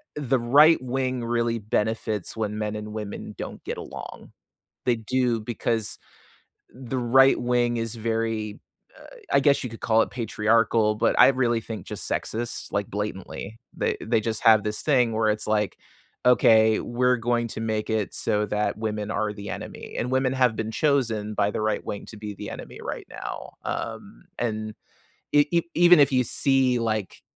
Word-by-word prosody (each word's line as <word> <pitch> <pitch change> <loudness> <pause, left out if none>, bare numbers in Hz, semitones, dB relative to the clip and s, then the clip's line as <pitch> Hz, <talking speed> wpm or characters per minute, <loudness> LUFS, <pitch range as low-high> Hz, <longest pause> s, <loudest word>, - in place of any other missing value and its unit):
the 135 -3 0
right 145 +6 +6
wing 130 -1 -2
really 115 0 0
benefits 105 -1 -2
when 105 -1 -2
men 105 0 -2
and 105 0 -6
women 105 -2 -6
don't - - -7
get - - -4
along. - - -9 0.6
They 120 -2 +3
do, 120 +1 0
because 115 0 -2 0.8
the 130 0 -4
right 130 +2 +5
wing 120 -1 +1
is 115 -1 -2
very 110 -2 -2 0.7
I - - +5
I - - +4
guess 140 +1 +3
you 125 - -4
could 115 - -10
call 115 0 +3
it - - -3
patriarchal, 110 -1 +2
but 110 - +1
I - - +9
really 125 -3 +1
think 110 -1 -7
just - - -6
sexist, 115 +1 -3
like, 100 0 -1
blatantly. 105 +1 -5 0.2
They - - 0
they 115 0 +2
just 110 0 -3
have 110 -2 +6
this 105 0 -2
thing 125 -6 +3
where 110 0 +2
it's 105 0 -1
like, 105 -1 0 0.5
"Okay, 110 -3 +5
we're 125 +1 +1
going 120 0 0
to 110 - -6
make 110 -1 -2
it 110 -2 -1
so 105 0 0
that 105 0 -1
women 105 -1 -3
are 105 -1 -1
the 100 -1 -8
enemy," - - -7
and 125 - -2
women 130 0 +1
have 125 -4 +2
been 110 0 -3
chosen 115 -7 0
by 100 0 +1
the - - -2
right 110 -1 0
wing 100 - -5
to 110 - -10
be 105 -1 -6
the - - -7
enemy - - -9
right - - -5
now, - - -7
um, - - -5
and 110 -2 -3 0.6
e 145 0 +5
e 170 -1 +3
even 175 -1 +7
if 140 -1 +5
you 130 -1 +3
see, 130 0 +2
like, 110 -4 -2
115 Hz, 180 wpm, -25 LUFS, 105-125 Hz, 0.8 s, I